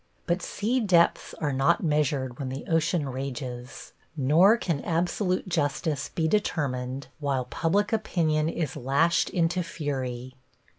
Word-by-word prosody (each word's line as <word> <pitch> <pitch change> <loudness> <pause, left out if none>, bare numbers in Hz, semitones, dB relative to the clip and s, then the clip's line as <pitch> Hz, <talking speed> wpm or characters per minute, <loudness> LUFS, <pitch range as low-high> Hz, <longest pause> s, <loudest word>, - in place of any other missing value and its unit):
But 175 +1 0
sea 230 +9 -1
depths 180 -7 +2
are 145 -3 -2
not 135 +1 +2
measured 145 -5 0
when 135 -2 -3
the 130 +1 -6
ocean 165 -2 +1
rages, 130 -2 -6 0.2
nor 165 - +5
can 165 -11 -2
absolute 180 +3 0
justice 150 -3 -1
be 160 -1 -1
determined 135 -9 -1
while 135 -4 -1
public 200 - 0
opinion 160 -8 +1
is 165 -4 -3
lashed 140 +7 +2
into 175 +1 +1
fury. 130 -6 -4
155 Hz, 130 wpm, -27 LUFS, 135-170 Hz, 0.2 s, nor